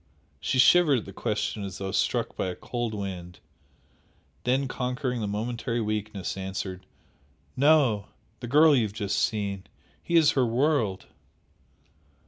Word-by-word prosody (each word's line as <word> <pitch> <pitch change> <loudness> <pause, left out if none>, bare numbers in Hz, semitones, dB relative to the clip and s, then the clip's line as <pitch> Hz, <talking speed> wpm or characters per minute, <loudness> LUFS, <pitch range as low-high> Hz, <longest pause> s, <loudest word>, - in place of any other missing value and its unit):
She - - -1
shivered 150 +1 +6
at 110 - -4
the 95 - -10
question 105 +1 -2
as 95 -1 -6
though 95 -1 -4
struck - - 0
by - - -2
a 90 - -4
cold 120 -3 -4
wind, 90 -3 -6 1.1
then 130 +2 +1
conquering 125 -1 -2
the 105 - -2
momentary 115 +3 -2
weakness, 105 -3 -3
answered 95 -1 -5 0.7
"No. 135 -8 +3 0.3
The 120 - -6
girl 150 +4 +6
you 125 - +3
have 105 -3 -2
just 100 -1 -1
seen. 100 -3 -1 0.4
He 170 - -2
is 160 -3 +6
her 130 - +2
world!" 120 -4 +1
110 Hz, 140 wpm, -27 LUFS, 100-130 Hz, 1.1 s, shivered